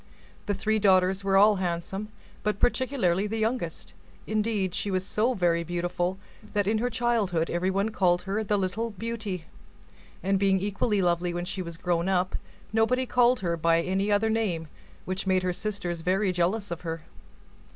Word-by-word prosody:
The 205 - +1
three 220 +2 +1
daughters 190 -1 +3
were 195 0 +3
all 205 +1 +6
handsome, 185 +3 -3 0.3
but 210 -1 -1
particularly 220 -8 +1
the 225 +2 -3
youngest; 220 -6 -2 0.3
indeed, 210 -4 0
she 205 - -2
was 185 -1 0
so 230 +6 +1
very 170 -3 +2
beautiful, 175 +2 -2 0.4
that 205 -1 +1
in 215 +2 +1
her 245 +2 0
childhood 220 -8 0
everyone 190 +4 0
called 180 -4 +2
her 200 +3 -1
the 210 0 +1
Little 200 +4 -1
Beauty; 210 -4 -4 0.8
and 195 +1 +2
being 195 -1 +3
equally 200 +1 0
lovely 175 0 +1
when 175 0 -2
she 195 +1 -3
was 170 -2 -7
grown 175 +1 0
up, 185 -1 +1 0.4
nobody 245 +4 +2
called 245 -1 +3
her 170 -2 0
by 165 +1 +2
any 195 +3 0
other 215 +2 +3
name, 180 -8 -1 0.4
which 185 +1 -3
made 185 -1 +2
her 180 -1 0
sisters 175 -4 -3
very 190 +3 +1
jealous 180 +3 0
of 170 - -4
her. 165 -2 -5
195 Hz, 170 wpm, -27 LUFS, 175-215 Hz, 0.8 s, all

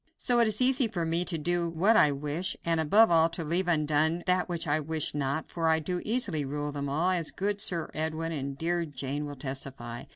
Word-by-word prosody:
So 245 -2 +2
it 235 - +4
is 215 +3 +2
easy 255 -1 +5
for 175 -6 -3
me 165 +2 +1
to 170 - 0
do 170 +2 0
what 185 +7 +2
I 150 -9 +5
wish, 150 +6 -2
and 165 -1 +1
above 200 +7 +4
all 165 0 +4
to 170 0 -4
leave 175 +4 +1
undone 160 +1 +1
that 180 0 0
which 170 -2 -2
I 150 +1 +1
wish 155 0 -1
not, 145 +1 -3
for 165 -1 -1
I 160 - +4
do 175 +3 -3
easily 210 - 0
rule 145 +1 -4
them 140 -1 -4
all, 160 +6 +1
as 170 -4 0
good 200 +1 -2
Sir 170 -6 +2
Edwin 160 +1 -3
and 140 -3 -4
dear 170 +3 -1
Jane 145 -1 -5
will 145 - -7
testify. 130 -3 -7
165 Hz, 225 wpm, -28 LUFS, 145-180 Hz, -, easy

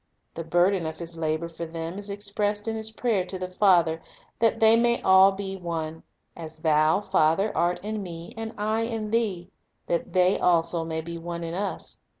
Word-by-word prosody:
The 165 - -5
burden 175 +1 +2
of 160 - -6
His 170 0 -3
labor 160 0 -2
for 170 0 -7
them 165 +3 -6
is 205 0 -5
expressed 205 +1 -1
in 225 - -1
His 220 0 -3
prayer 220 -3 0
to 190 - -3
the 185 0 -6
Father, 175 -4 +3 0.4
"that 225 0 +2
they 230 +2 +5
all 190 +1 +7
may.be 195 0 -5
one; 160 -3 -4 0.3
as 160 -2 -9
Thou, 155 +2 +3
Father, 195 +2 +1
art 175 +1 +1
in 215 0 -3
Me, 170 -2 -8
and 225 0 -6
I 215 +2 0
in 225 -2 -3
Thee, 200 -6 -1 0.3
that 170 - -2
they 185 0 +3
also 170 -1 +2
may 160 0 -3
be 170 +1 -7
one 170 0 -5
in 165 0 -4
Us 190 -1 -4
180 Hz, 185 wpm, -26 LUFS, 165-205 Hz, 0.4 s, all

